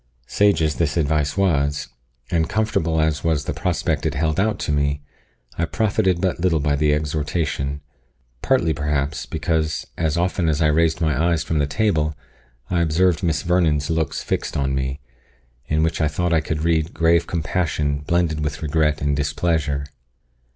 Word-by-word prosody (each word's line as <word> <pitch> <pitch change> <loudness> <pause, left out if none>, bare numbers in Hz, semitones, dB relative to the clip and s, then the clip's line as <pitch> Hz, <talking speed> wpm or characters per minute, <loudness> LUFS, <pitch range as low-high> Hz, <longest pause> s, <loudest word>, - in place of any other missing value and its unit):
Sage 100 +1 +2
as 75 -1 0
this 80 -1 0
advice 75 0 0
was, 75 -6 +1 0.4
and 80 -1 +1
comfortable 85 -7 0
as 80 -1 0
was 80 -3 +1
the - - -2
prospect 80 -1 -1
it 80 -3 -1
held 80 +4 0
out 105 +1 +1
to - - -1
me, 70 0 0 0.6
I 85 - +2
profited 100 -2 +1
but 90 -1 -1
little 85 -3 +2
by 70 0 +1
the 75 +1 +2
exhortation 75 -1 -1 0.6
partly, 125 -12 +2
perhaps, 75 0 -2
because, 80 0 -1
as 80 -1 0
often 90 -1 +1
as 75 -1 0
I 80 -1 +3
raised 80 +2 +2
my 80 +2 +2
eyes 80 -2 +1
from 80 - -1
the 70 - +1
table, 75 -3 0 0.5
I 90 -1 0
observed 85 0 +2
Miss 80 -3 0
Vernon's 80 -4 +1
looks 80 -2 -1
fixed - - -2
on 70 -1 0
me, 65 +1 -2 0.7
in 80 +1 +1
which 80 +1 0
I 80 - +3
thought 85 +3 -1
I 80 - +3
could 80 0 -3
read 80 0 +1
grave 85 +1 +3
compassion 80 -3 -1
blended 80 +1 0
with 75 +1 -3
regret 75 0 +1
and 70 0 +1
displeasure. 75 -1 0
80 Hz, 170 wpm, -22 LUFS, 75-85 Hz, 0.7 s, I